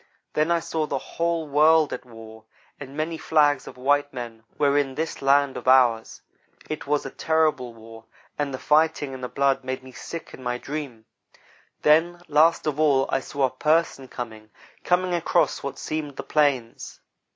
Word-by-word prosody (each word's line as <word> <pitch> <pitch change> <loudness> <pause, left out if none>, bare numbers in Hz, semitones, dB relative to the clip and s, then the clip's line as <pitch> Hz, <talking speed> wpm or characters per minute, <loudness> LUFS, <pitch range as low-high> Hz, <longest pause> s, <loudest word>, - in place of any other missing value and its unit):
Then 155 +2 +1
I 170 0 +3
saw 160 -1 -2
the 140 - -2
whole 165 +2 -2
world 155 +2 +4
at - - -6
war, 110 -2 -13 0.3
and 135 0 -9
many 160 +1 -2
flags 145 -3 +2
of - - -10
white 145 +2 +1
men 120 -3 -8
were 140 -1 +2
in 140 -2 +1
this 160 +3 -4
land 140 0 +3
of 125 - -8
ours. 125 -4 +3 0.4
It 155 -2 -5
was 145 -1 0
a 135 - -5
terrible 155 -7 0
war, 115 0 -13 0.3
and 145 -1 -2
the 130 - -4
fighting 150 -1 +1
and 130 -1 -8
the 125 - -3
blood 140 -1 +1
made 130 0 -4
me 130 - -12
sick 165 +6 -8
in - - -11
my 125 -1 -2
dream. 135 -5 -6 0.8
Then, 165 +3 +4
last 155 +2 +3
of 150 -1 -2
all, 140 -4 +3
I 135 - +1
saw 140 +1 -4
a 130 - -2
'person' 150 -1 +1
coming 110 -4 -8 0.3
coming 180 0 +1
across 170 -2 +1
what 140 - -5
seemed 155 -3 -4
the - - -6
plains. 140 -6 0
140 Hz, 180 wpm, -24 LUFS, 130-155 Hz, 0.8 s, world